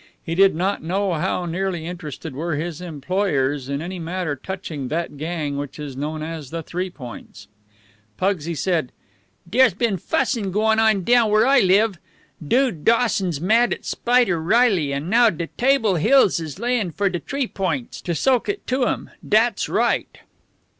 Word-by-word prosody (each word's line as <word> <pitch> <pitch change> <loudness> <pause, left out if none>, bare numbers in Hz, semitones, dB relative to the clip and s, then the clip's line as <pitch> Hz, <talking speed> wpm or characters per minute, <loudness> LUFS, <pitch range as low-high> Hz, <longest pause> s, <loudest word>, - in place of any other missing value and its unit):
He 165 - -4
did 195 +1 +4
not 190 +4 -1
know 190 +3 -1
how 170 +2 -1
nearly 175 -1 -2
interested 160 -3 -7
were 160 +3 -2
his 165 +2 -4
employers 145 -4 -1
in 140 +2 -2
any 180 +1 -5
matter 170 -2 -3
touching 155 -3 -6
that 160 +2 -3
gang 150 -1 -3
which 145 -1 -6
is 145 -3 -7
known 155 +3 -4
as 160 -4 -6
the 165 +1 -5
Three 180 +4 -3
Points. 120 - -11 0.7
Pugsy 170 -4 -1
said: 160 -3 -1 0.6
"Dere's 235 +1 +4
been 215 -2 0
fuss'n 225 - -1
going 220 +3 +2
on 220 -4 +3
down 235 +1 +4
where 215 +2 +4
I 270 +1 +5
live. 195 0 +3 0.4
Dude 235 - +1
Dawson's 205 - +2
mad 225 +8 +3
at - - -18
Spider 240 -9 +2
Reilly, 190 - +3
and 140 +3 -3
now 230 +4 +5
de 170 -3 -4
Table 245 -7 +2
Hills 200 - +4
is 160 -2 -6
layin' 235 -3 0
for 200 +5 0
de 180 -2 -2
T'ree 275 +5 -2
Points, 175 - -3
to 170 - -2
soak 255 - +1
it 405 0 -3
to 255 0 +1
'em. - - -3
Dat's - - +2
right." - - 0
180 Hz, 165 wpm, -22 LUFS, 155-220 Hz, 0.7 s, I